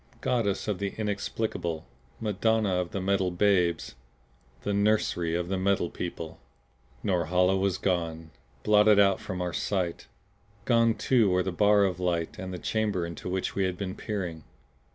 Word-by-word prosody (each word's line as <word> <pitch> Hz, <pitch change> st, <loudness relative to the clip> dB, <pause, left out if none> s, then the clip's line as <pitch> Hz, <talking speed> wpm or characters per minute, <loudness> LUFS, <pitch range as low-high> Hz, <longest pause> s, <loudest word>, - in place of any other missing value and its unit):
Goddess 110 Hz, -6 st, 0 dB
of 105 Hz, -4 st, -1 dB
the 100 Hz, -1 st, -3 dB
Inexplicable! 100 Hz, -5 st, -2 dB, 0.3 s
Madonna 110 Hz, -1 st, +1 dB
of 90 Hz, -1 st, -1 dB
the 100 Hz, -, -4 dB
Metal 95 Hz, 0 st, +1 dB
Babes! 90 Hz, -2 st, +1 dB, 0.7 s
The 100 Hz, -, -1 dB
Nursery 100 Hz, -5 st, +1 dB
of 85 Hz, 0 st, -1 dB
the 95 Hz, 0 st, -1 dB
Metal 95 Hz, -3 st, +1 dB
People! 85 Hz, -2 st, -6 dB, 0.6 s
Norhala 90 Hz, 0 st, +2 dB
was 95 Hz, -1 st, +1 dB
gone, 80 Hz, -3 st, -2 dB, 0.3 s
blotted 105 Hz, 0 st, +5 dB
out 100 Hz, -1 st, +4 dB
from 90 Hz, -1 st, -4 dB
our 90 Hz, -, -3 dB
sight! 90 Hz, -4 st, -2 dB, 0.6 s
Gone 115 Hz, -2 st, +4 dB
too 120 Hz, -6 st, +3 dB
were 90 Hz, 0 st, +2 dB
the 95 Hz, -, -2 dB
bar 105 Hz, +2 st, +4 dB
of 90 Hz, -3 st, 0 dB
light 85 Hz, -2 st, -1 dB
and 95 Hz, 0 st, -5 dB
the 90 Hz, -, -4 dB
chamber 105 Hz, -2 st, -1 dB
into 85 Hz, +1 st, -6 dB
which 95 Hz, 0 st, -2 dB
we 95 Hz, -, +1 dB
had 90 Hz, -1 st, -2 dB
been 95 Hz, -1 st, -4 dB
peering. 90 Hz, -7 st, -4 dB
95 Hz, 155 wpm, -28 LUFS, 90-105 Hz, 0.7 s, blotted